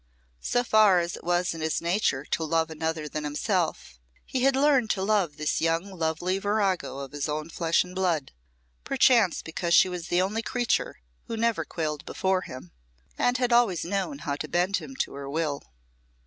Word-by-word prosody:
So 245 - +1
far 215 -5 +5
as 170 0 -1
it - - -12
was 175 0 +1
in 165 - -7
his 160 0 0
nature 170 -6 0
to 165 - -2
love 160 +1 0
another 160 0 -3
than 150 +1 -4
himself, 155 - -2 0.3
he 260 - -2
had 270 +1 +4
learned 270 -4 +3
to 190 - 0
love 195 -7 +1
this 155 0 -1
young 165 +4 0
lovely 175 +2 -1
virago 200 -7 0
of 140 -1 -7
his 145 0 -3
own 155 +2 -3
flesh 165 -1 +2
and 180 0 -11
blood, 175 -7 0 0.5
perchance 245 -8 +3
because 170 +1 0
she - - +7
was 175 -1 -5
the 175 - +1
only 200 +5 0
creature 240 - -1 0.3
who - - -5
had 225 - -3
never 230 -1 +1
quailed 150 -3 -3
before 190 -1 0
him, 130 - -10 0.4
and 245 +1 +1
had 245 -1 +1
always 220 -10 +3
known 200 - -2
how 140 - -1
to 155 - -5
bend 180 +5 +1
him 150 -6 -8
to - - -2
her 140 0 -7
will. 150 -1 -2
175 Hz, 190 wpm, -27 LUFS, 155-205 Hz, 0.5 s, she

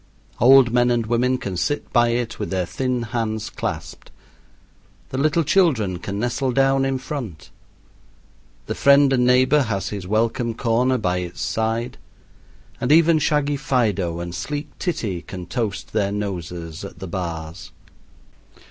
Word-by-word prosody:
Old 130 0 +7
men 120 0 +3
and 120 -2 +1
women 125 +3 +1
can 100 -6 -5
sit 145 +11 -2
by 120 -1 +5
it 120 -1 -2
with 105 - -3
their 95 -1 -1
thin 125 +3 -2
hands 110 -2 -3
clasped, - - -5 1.0
the 130 - -4
little 155 +3 +2
children 135 - +2
can 100 +3 -5
nestle 120 +4 -1
down 135 +1 +3
in 135 0 0
front, 125 - -7 1.1
the - - -3
friend 140 0 +5
and 125 -1 +3
neighbor 130 +4 +4
has 100 -6 -2
his 100 -3 -6
welcome 115 +2 0
corner 120 +3 +1
by 90 -6 0
its 90 -1 -5
side, 115 +2 -2 0.8
and 125 - 0
even 165 0 +5
shaggy 145 -1 +1
Fido 105 - 0
and 85 0 -5
sleek 145 - -4
Titty 115 - -2
can 90 -2 -8
toast 110 -4 -4
their 100 -2 +1
noses 90 -5 -5
at 100 - -9
the 95 - -7
bars. 80 -3 -5
115 Hz, 150 wpm, -22 LUFS, 95-135 Hz, 1.1 s, Old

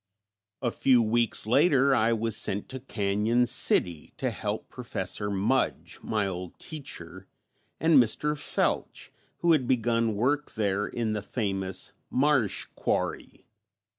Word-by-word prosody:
A 120 - +1
few 130 0 +3
weeks 115 0 +1
later 135 +3 +4
I 115 -2 +3
was 115 -1 +1
sent 100 +1 +2
to 130 - -6
Cañon 110 0 0
City 90 -9 0
to - - -1
help - - -4
Professor 105 - -4
Mudge, 105 +7 -1
my 105 -2 -1
old 90 -2 -6
teacher, 95 - -9 0.5
and 160 -4 +6
Mr. 150 +6 0
Felch, 145 - -2 0.3
who 170 - +3
had 140 -6 +3
begun 115 -3 +1
work 140 +7 0
there 100 -1 0
in 115 -2 -2
the 105 - -2
famous 95 -4 -2 0.2
"Marsh 130 -8 +1
Quarry". - - -3
115 Hz, 130 wpm, -27 LUFS, 100-130 Hz, 0.5 s, and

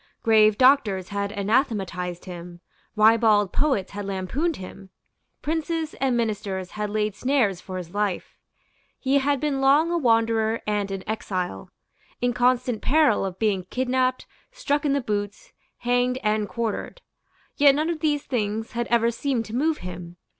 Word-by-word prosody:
Grave 215 -2 +5
doctors 235 -9 +3
had 200 0 -2
anathematized 200 -5 -1
him; 175 -1 -9 0.4
ribald 215 -2 +4
poets 265 -10 0
had 205 0 -5
lampooned 200 - -2
him; 190 +1 -10 0.5
princes 320 0 -2
and 260 -3 +2
ministers 205 -5 -2
had 210 0 -3
laid 210 0 -1
snares 230 -8 +1
for 185 -1 -7
his 175 -2 -8
life; 205 -3 -2 0.6
he 275 +1 +2
had 280 0 +1
been 285 -2 -1
long 290 +5 +4
a 345 - +1
wanderer 225 -3 +2
and 205 -1 -1
an 195 -1 -5
exile, 185 - -4 0.5
in 245 +1 0
constant 245 -1 +1
peril 290 -8 +3
of 190 -2 -4
being 200 -4 0
kidnapped, 255 0 0 0.3
struck 305 -13 -1
in 280 - +2
the 280 - +1
boots, 205 - -4 0.2
hanged 245 +1 +1
and 210 -1 0
quartered. 235 - -4 0.5
Yet 280 -2 +6
none 310 +3 0
of 330 - -4
these 295 -2 0
things 220 -3 -2
had 235 0 -2
ever 235 0 +2
seemed 240 -1 -2
to 220 - -7
move 305 +4 +1
him. 175 -1 -8
225 Hz, 155 wpm, -24 LUFS, 200-270 Hz, 0.6 s, Yet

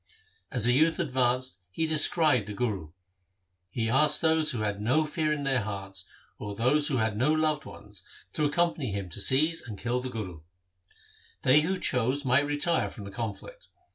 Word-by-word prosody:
As 120 -5 +3
the 120 - +4
youth 160 +5 +3
advanced 130 - 0
he 160 - -2
descried 155 - +3
the 105 - -6
Guru. 100 -8 -3 0.8
He 115 +4 -2
asked 150 +5 +5
those 160 -1 +3
who 115 - -1
had 105 -1 -2
no 130 +9 +2
fear 155 0 -1
in 150 -2 -2
their 135 -3 +1
hearts 95 -2 -6 0.3
or 105 -1 -6
those 135 +7 +2
who 135 - 0
had 110 -2 0
no 130 +8 +2
loved 155 -1 0
ones, 105 -3 -11 0.3
to 150 -2 +1
accom 170 +3 +1
pany 130 -8 -4
him 100 -2 -4
to 100 - -4
seize 155 +8 +3
and 110 -4 -8
kill 120 +3 -2
the 130 +1 -5
Guru. 95 -9 -6 1.0
They 135 +4 +5
who 185 +5 -1
chose 130 -3 -1
might 130 +3 +3
retire 145 +3 0
from 105 - -10
the 100 - -8
conflict. 115 - -7
130 Hz, 185 wpm, -28 LUFS, 105-150 Hz, 1.0 s, asked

